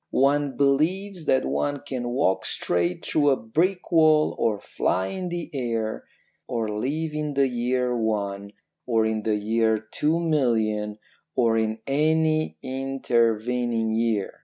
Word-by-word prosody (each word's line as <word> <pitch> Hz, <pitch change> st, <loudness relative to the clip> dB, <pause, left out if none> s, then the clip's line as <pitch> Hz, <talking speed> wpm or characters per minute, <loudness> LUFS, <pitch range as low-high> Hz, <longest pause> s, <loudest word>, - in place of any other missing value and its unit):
One 140 Hz, +1 st, +2 dB
believes 165 Hz, +6 st, +1 dB
that 130 Hz, -, +2 dB
one 75 Hz, -, -1 dB
can 125 Hz, -3 st, -3 dB
walk 95 Hz, -7 st, +1 dB
straight 90 Hz, 0 st, -1 dB
through 145 Hz, -2 st, +2 dB
a 135 Hz, -, +4 dB
brick 175 Hz, +13 st, -1 dB
wall, 155 Hz, -2 st, +4 dB
or 110 Hz, -3 st, +1 dB
fly 95 Hz, -1 st, -1 dB
in 185 Hz, -2 st, -4 dB
the 175 Hz, -1 st, -5 dB
air, 115 Hz, -5 st, -2 dB, 0.4 s
or 115 Hz, -3 st, -1 dB
live 145 Hz, +9 st, -2 dB
in 150 Hz, -1 st, -3 dB
the 135 Hz, 0 st, +3 dB
year 125 Hz, 0 st, 0 dB
one, 100 Hz, -3 st, -2 dB, 0.3 s
or 115 Hz, -2 st, +2 dB
in 110 Hz, 0 st, -1 dB
the 110 Hz, 0 st, 0 dB
year 110 Hz, +1 st, +1 dB
two 150 Hz, +9 st, -1 dB
million, 110 Hz, -10 st, 0 dB, 0.4 s
or 115 Hz, -3 st, +3 dB
in 110 Hz, 0 st, -1 dB
any 155 Hz, +2 st, +1 dB
intervening 120 Hz, -3 st, 0 dB
year. 110 Hz, -3 st, -1 dB
125 Hz, 135 wpm, -25 LUFS, 110-150 Hz, 0.4 s, a